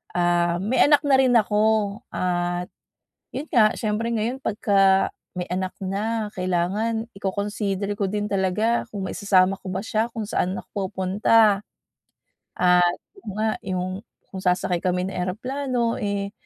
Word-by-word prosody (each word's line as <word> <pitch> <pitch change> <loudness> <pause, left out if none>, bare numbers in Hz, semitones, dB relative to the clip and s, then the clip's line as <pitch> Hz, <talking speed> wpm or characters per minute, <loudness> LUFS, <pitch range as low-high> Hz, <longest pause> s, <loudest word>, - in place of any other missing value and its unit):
ah, 175 0 +2
may 235 +5 +3
anak 290 -1 +5
na 270 - +5
rin 260 -2 +4
ako. 210 -1 +1 0.5
At, 175 0 -1 0.7
yun 295 +4 -4
nga 215 -3 +5
siyempre, 220 +1 -1
ngayon 230 +4 -1
pagka 195 -2 +3 0.3
may 180 0 -3
anak 185 0 -2
na, 210 +3 -2
kailangan 200 +6 -1
i-co-consider 200 0 -2
ko 200 - 0
din 210 0 -2
talaga 200 +5 +1
kung 195 -2 -3
maisasama 190 -1 +2
ko 190 - -7
ba 190 - -2
siya 220 +1 +1
kung 220 -2 -4
saan 185 +1 0
ako 195 -2 -4
pupunta. 205 +2 +3 1.0
At, 180 -1 +4 0.2
ayun 385 - -9
nga 220 0 +1 0.2
yung 185 0 -2 0.4
kung 190 - -5
sasakay 180 -1 +1
kami 180 +1 0
ng - - -7
eroplano, 240 +5 -1
eh 200 -1 -2
200 Hz, 140 wpm, -24 LUFS, 185-220 Hz, 1.0 s, anak